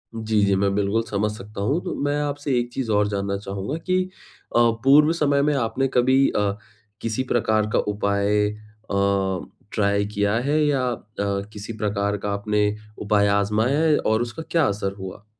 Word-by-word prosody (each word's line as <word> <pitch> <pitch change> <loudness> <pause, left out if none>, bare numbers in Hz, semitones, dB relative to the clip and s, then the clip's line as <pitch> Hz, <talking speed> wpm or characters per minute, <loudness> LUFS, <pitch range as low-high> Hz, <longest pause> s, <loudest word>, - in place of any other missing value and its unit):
जी, 110 -1 0
जी, 100 -1 +2
मैं 100 0 +1
बिल्कुल 105 +3 +1
समझ 105 +1 0
सकता 105 0 -8
हूँ। 140 - +1
तो 180 - -3
मैं 145 - +1
आपसे 145 -2 -1
एक 120 0 -3
चीज़ 130 -4 -3
और 105 0 +3
जानना 100 -1 -2
चाहूँगा 100 +6 -4
कि 185 +2 0 0.5
अ, - - +5 0.2
पूर्व 150 +4 +6
समय 145 -4 +2
में 150 +1 +2
आपने 130 +2 0
कभी 130 +2 +4
अ, 100 -1 0 0.4
किसी 115 +3 -1
प्रकार 110 -2 +2
का - - +3
उपाय 100 0 +1
अ, 100 -3 -2 0.2
ट्राई 100 -1 +1
किया 100 0 +1 0.2
है 155 - +3
या 140 -3 +1
अ, 120 - -5 0.5
किसी 105 +2 -7
प्रकार 100 -1 -1
का 100 +1 -3
आपने 105 +1 +1 0.3
उपाय 100 -1 +2
आज़माया 110 +8 +1
है 160 -2 +4
और 110 +1 +1
उसका 120 +7 -4
क्या 165 -3 +3
असर 100 -1 -2
हुआ? 95 +2 -8
105 Hz, 175 wpm, -23 LUFS, 100-130 Hz, 0.5 s, पूर्व